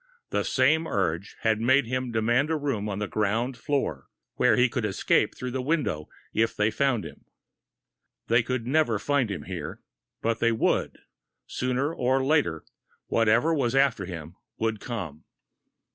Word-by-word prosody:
The - - +1
same 155 +5 +2
urge 95 - -1
had 110 -1 +1
made 130 +3 +4
him 130 +1 -2
demand 120 +6 +2
a 160 - +1
room 130 -8 -2
on 100 - -3
the 105 0 -2
ground 115 +5 0
floor, 140 +3 -2 0.3
where - - +3
he 125 - +4
could 120 0 -3
escape 100 -2 +1
through 125 0 -5
the 130 +1 -2
window 130 - -1 0.2
if 115 +1 +1
they 105 +1 +2
found 135 -5 +1
him. - - -11 1.0
They 115 +1 +4
could 125 0 -3
never 130 -4 +2
find 140 +1 +1
him 90 -8 -4
here - - -6 0.4
but 115 0 -1
they 115 - +3
would! 110 - 0 0.5
Sooner 130 +5 -1
or 130 0 +1
later, 135 - +1 0.4
whatever 115 +8 +3
was 130 -5 0
after 135 -8 +3
him 85 -2 -8 0.2
would 110 -1 -1
come! 90 -12 -6
120 Hz, 160 wpm, -26 LUFS, 105-135 Hz, 1.0 s, made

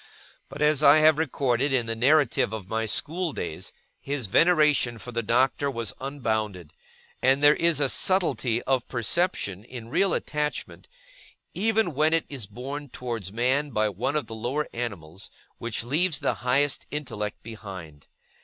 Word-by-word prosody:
But, 145 +2 -3
as 150 -1 +3
I 145 0 +7
have 155 0 +5
recorded 135 -3 0
in 125 -3 +1
the 115 0 -3
narrative 135 -2 +3
of 105 -4 -6
my 110 +2 -2
school 165 - -1
days, 80 -3 -5 0.3
his 140 -3 -3
veneration 150 - +3
for 125 - -9
the 115 0 -1
Doctor 130 +5 +1
was 115 -4 -3
unbounded; 110 - -3 0.5
and 135 +2 +3
there 145 0 +8
is 170 -1 +2
a 145 - +3
subtlety 135 -9 +1
of 130 -2 0
perception 120 - -1
in 120 -1 -9
real 195 +9 +2
attachment, 150 0 -3 0.7
even 220 -2 +1
when 155 +3 +3
it 165 - 0
is 130 -8 -5
borne 135 +7 -7
towards 115 -7 -5
man 130 +6 +1
by 110 -4 +1
one 125 +9 -2
of 150 -5 0
the 110 - -9
lower 120 +7 -2
animals, 95 -7 -6 0.3
which 115 -1 -3
leaves 155 +6 +2
the - - 0
highest 135 +3 +1
intellect 115 -8 -5
behind. 95 -9 -10
130 Hz, 155 wpm, -26 LUFS, 110-150 Hz, 0.7 s, there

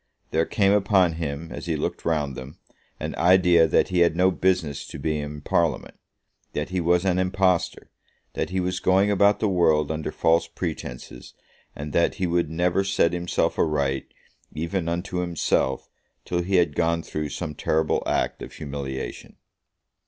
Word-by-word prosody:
There 80 +1 +1
came 100 -2 +2
upon 95 -4 +3
him, 80 +1 -4
as - - -7
he - - 0
looked - - -3
round 75 -5 0
them, 65 +6 -9 0.4
an - - -4
idea 90 -1 +5
that 80 - +2
he 90 -1 +1
had 85 -2 +4
no 90 +2 +4
business 90 -7 0
to - - -8
be 75 +2 -1
in 75 0 -6
Parliament, 85 +1 0 0.6
that 75 +2 -3
he 90 -1 -1
was 85 +2 +2
an 90 -1 +2
impostor, 95 -1 0 0.4
that - - -2
he 95 +1 -1
was 90 0 -1
going 95 +2 +3
about 100 +1 +4
the 110 - +1
world 80 -5 +2
under 80 0 -3
false 85 +1 +2
pretences, 70 -8 -7 0.4
and 75 0 -6
that 85 - +2
he 95 - -1
would 85 -2 0
never 90 +3 +1
set 95 -3 +1
himself 90 0 -1
aright, 70 -4 0 0.4
even 85 +3 -2
unto 90 +2 -3
himself, 85 -6 0 0.4
till 90 0 -1
he 95 +2 -1
had 85 -5 +3
gone 85 -1 +1
through 75 -1 -4
some 80 -1 -5
terrible 80 +1 0
act - - -1
of - - -8
humiliation. 70 -2 -6
85 Hz, 165 wpm, -24 LUFS, 75-90 Hz, 0.6 s, idea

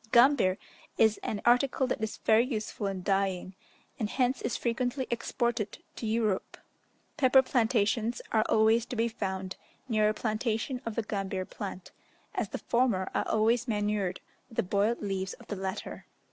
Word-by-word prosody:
Gambir 235 -7 +5 0.4
is 220 -1 +4
an 205 - -4
article 250 +2 +4
that 255 - -2
is 220 -1 -3
very 220 +1 +4
useful 220 -4 -3
in 190 -2 -4
dyeing, 195 -1 0 0.5
and 215 -3 -1
hence 255 +1 +1
is - - -1
frequently 245 +2 -1
exported 235 -2 -1 0.2
to 225 - -4
Europe. 215 -3 0 0.6
Pepper 265 -2 +6
plantations 230 -2 +1
are 220 -1 +4
always 220 +1 +4
to - - -5
be 230 0 +2
found 190 -4 -4 0.3
near 215 -3 +3
a - - +1
plantation 225 +3 -1
of 225 - -3
the 230 - 0
gambir 195 -3 -3
plant, 190 -3 -7 0.4
as - - -2
the - - -3
former 235 -6 +1
are - - 0
always 230 +3 +2
manured 205 -4 -1 0.3
with 230 - -14
the - - +2
boiled 205 +5 +1
leaves 190 -2 -2
of - - -14
the 205 - -2
latter. 190 0 -5
220 Hz, 160 wpm, -30 LUFS, 200-240 Hz, 0.6 s, Pepper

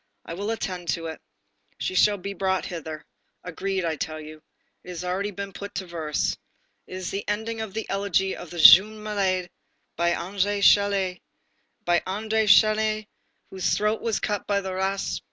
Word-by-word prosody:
I - - -6
will 200 +5 -4
attend 185 -6 -4
to 165 +3 -1
it. 160 -1 -6 0.6
She - - -3
shall 205 +2 +4
be 200 +1 -5
brought 190 0 -1
hither. 160 -3 -7 0.4
Agreed, 190 +1 -3
I 160 -2 -1
tell 155 +1 -4
you. 155 0 -11 0.4
It - - -12
has 180 -1 -6
already 185 +3 -1
been 200 -1 -7
put 200 0 -6
into 190 - -7
verse. 160 -4 -2 0.5
This 185 0 -7
is - - -3
the 195 - -3
ending 220 +2 -2
of 215 -3 -6
the 220 - -3
elegy 195 -1 0
of 175 - -9
the 175 - -9
'Jeune 205 +6 +8
Malade' 190 -4 -1 0.4
by 170 +1 +1
André 200 +3 -1
Chénier, 195 -3 +3 0.6
by 175 0 +3
André 220 +3 0
Chénier 215 +1 +4 0.5
whose 190 -1 0
throat 210 +1 0
was 230 -2 -1
cut 205 -1 -2
by 200 -1 +2
the 190 -1 -5
ras. 190 +1 -1
195 Hz, 175 wpm, -25 LUFS, 175-205 Hz, 0.6 s, Jeune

